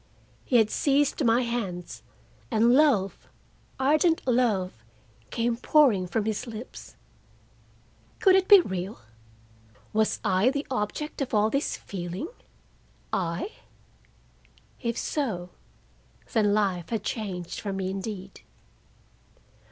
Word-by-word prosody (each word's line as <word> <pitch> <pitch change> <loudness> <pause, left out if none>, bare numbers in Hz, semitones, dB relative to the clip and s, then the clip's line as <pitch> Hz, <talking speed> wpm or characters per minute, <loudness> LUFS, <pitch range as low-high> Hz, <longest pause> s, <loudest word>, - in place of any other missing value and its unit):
He 255 - -1
had 220 -2 +5
seized 285 +1 +2
my 235 +1 +3
hands, 185 - -4 0.5
and 230 +2 +4
love, 250 -10 +2 0.5
ardent 310 +5 +3
love, 225 -7 +2 0.6
came 230 0 0
pouring 235 -7 +3
from 205 +4 -1
his 220 +3 -2
lips. 230 +1 -9 1.2
Could 385 - +5
it 380 0 +3
be 405 -3 +9
real? 190 - -5 0.9
Was 220 0 +1
I 190 +6 +3
the 285 +2 -2
object 255 +7 -3
of 255 -4 -1
all 210 +1 +3
this 275 +1 -1
feeling, 180 - -6 0.8
I? 170 -2 -1 1.3
If 235 -1 -2
so, 190 - -2 0.8
then 215 -3 +3
life 195 -5 0
had 225 -3 -2
changed 190 -7 -4
for 205 - -4
me 190 -1 -2
indeed. 195 -1 -6
220 Hz, 110 wpm, -27 LUFS, 190-255 Hz, 1.3 s, be